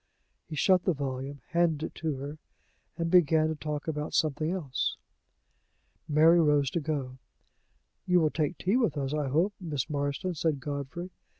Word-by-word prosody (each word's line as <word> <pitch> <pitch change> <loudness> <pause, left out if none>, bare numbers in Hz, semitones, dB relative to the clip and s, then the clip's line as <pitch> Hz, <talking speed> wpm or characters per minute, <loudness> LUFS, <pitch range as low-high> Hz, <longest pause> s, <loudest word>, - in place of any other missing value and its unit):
He 155 - -5
shut 185 +4 +3
the 185 - +2
volume, 135 0 -4
handed 165 -3 +1
it - - -8
to 160 -3 -1
her, 145 +3 -7 0.6
and 165 -1 -1
began 160 -3 +5
to 160 - -2
talk 150 +1 -4
about 150 -1 -3
something 155 0 +1
else. 165 -8 -2 1.1
Mary 160 +3 +6
rose 145 -3 +3
to 170 - 0
go. 140 -4 -3 0.9
"You 180 -1 +5
will 155 -2 +2
take 160 +2 -1
tea 195 +7 +1
with 230 - +1
us, 140 0 -2
I 150 -2 0
hope, 165 +10 +2
Miss 150 -5 -3
Marston," 145 +5 -1
said 155 -3 0
Godfrey. 145 +5 -5
155 Hz, 165 wpm, -29 LUFS, 140-170 Hz, 1.1 s, Mary